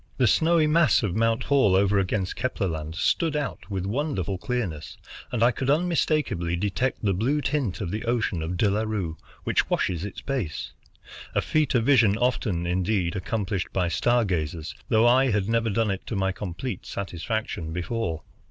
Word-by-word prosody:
The 130 - +3
snowy 160 +6 +4
mass 150 -8 +4
of 100 -5 0
Mount 115 +2 +1
Hall 135 -10 +3
over 100 +1 +3
against 95 -1 -1
Kepler 125 -6 -1
Land 80 -1 -4
stood 155 - +1
out 145 -6 -4
with 95 -2 -2
wonderful 100 - -2
clearness, 95 -11 -3 0.3
and 120 -2 +1
I 120 - +5
could 130 +3 -3
unmistakably 155 - +1
detect 105 +9 -1
the 100 -2 +2
blue 125 +11 +1
tint 135 -11 -1
of 90 -4 -3
the 110 +3 -3
ocean 115 -7 0
of 85 +3 -3
De 105 - +3
La 100 +2 +1
Rue, 105 -7 -2 0.3
which - - +1
washes 85 -2 0
its 105 -1 -6
base, 125 - -3 0.6
a - - +3
feat 155 -4 +1
of 115 -2 +2
vision 115 -7 +5
often, 110 -8 0
indeed, 90 0 0
accomplished 100 -1 -2
by 90 -2 +1
star 120 +7 +2
gazers, 80 -4 -2 0.2
though 110 +1 +4
I 130 +2 +5
had 100 -3 0
never 115 0 +1
done 110 0 +1
it 95 - -5
to 115 - -3
my 95 0 +1
complete 95 +3 -5
satisfaction 95 -2 -3
before. 90 -1 -3
105 Hz, 180 wpm, -25 LUFS, 90-125 Hz, 0.6 s, I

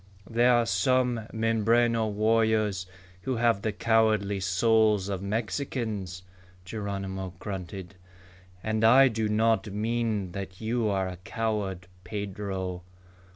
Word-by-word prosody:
"There 120 +2 +3
are 120 -1 +4
some 115 +3 +1
Mimbreno 115 +1 +2
warriors 110 -3 +1 0.3
who 130 +3 -2
have 115 -3 +2
the 110 -1 -1
cowardly 110 -2 +2
souls 105 +2 +2
of 95 -2 -3
Mexicans," 105 -3 -3 0.4
Geronimo 95 -2 -5
grunted. 95 0 -6 0.7
"And 110 0 -1
I 130 +4 +7
do 110 -2 -1
not 110 +1 +2
mean 110 -2 -1
that 95 -1 -7
you 115 0 0
are 95 -2 0
a 90 -1 -6
coward, 100 -2 -3 0.2
Pedro." 95 -2 -4
110 Hz, 110 wpm, -27 LUFS, 95-115 Hz, 0.7 s, I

